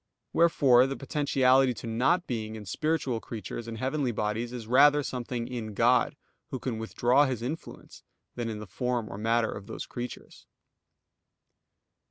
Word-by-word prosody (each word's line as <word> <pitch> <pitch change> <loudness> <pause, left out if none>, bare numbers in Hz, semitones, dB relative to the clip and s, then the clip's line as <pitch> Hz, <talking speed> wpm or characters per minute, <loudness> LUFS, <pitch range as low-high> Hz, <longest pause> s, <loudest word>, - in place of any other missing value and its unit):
Wherefore 135 -7 +5
the 135 - -3
potentiality 135 -3 +2
to - - -8
not 130 +11 +1
being 110 -3 -4
in 105 -1 -8
spiritual 135 - -1
creatures 115 +1 -7
and 115 -1 -6
heavenly 130 +1 -1
bodies 110 +2 -2
is 120 -3 -6
rather 145 +5 +5
something 125 -2 -4
in 110 -4 -5
God, 120 +4 +3 0.3
Who 130 - -3
can 120 -3 -4
withdraw 125 +5 +3
His 125 -3 -3
influence, 150 +7 -7 0.3
than 120 -2 -3
in 110 - -4
the 105 - -7
form 120 +3 -2
or 100 - -7
matter 115 +1 +1
of 100 -1 -8
those - - -6
creatures. 125 0 -8
120 Hz, 155 wpm, -28 LUFS, 115-135 Hz, 0.3 s, Wherefore